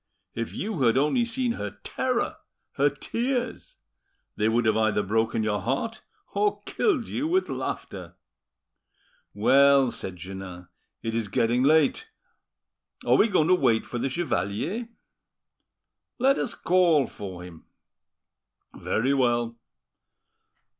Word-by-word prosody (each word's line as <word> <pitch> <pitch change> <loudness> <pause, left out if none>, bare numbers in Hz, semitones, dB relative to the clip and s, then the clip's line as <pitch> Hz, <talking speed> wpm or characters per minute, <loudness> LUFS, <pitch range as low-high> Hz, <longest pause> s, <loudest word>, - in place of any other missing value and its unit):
If 115 0 -4
you 205 -7 -3
had 120 -1 +4
only 150 - +2
seen 240 +1 -1
her 105 - -5
terror, - - -1 0.3
her 145 +1 +2
tears! 245 - -3 0.6
They 110 +1 +1
would 120 +1 +1
have 110 -1 +3
either 110 -2 +2
broken 110 +2 0
your 105 -1 -1
heart 140 - -2 0.3
or 415 0 0
killed 375 - 0
you 300 - -2
with 370 +3 +1
laughter." - - -5 1.2
"Well," 140 -2 +5
said 95 - -6
Jeannin, 90 -1 -9 0.3
"it 115 -1 -2
is 115 -2 -1
getting 115 +4 +1
late. 155 - +3 1.0
Are - - +3
we 220 - +5
going 180 -6 +2
to - - +6
wait 125 -10 +2
for 120 - -5
the 135 - -1
chevalier?" 175 - -2 1.3
"Let 270 +2 +3
us 245 - -3
call, 175 -6 +3
for 95 -6 -8
him." 85 -3 -12 1.1
"Very 130 +5 0
well. 120 -3 +1
130 Hz, 125 wpm, -26 LUFS, -, 1.3 s, to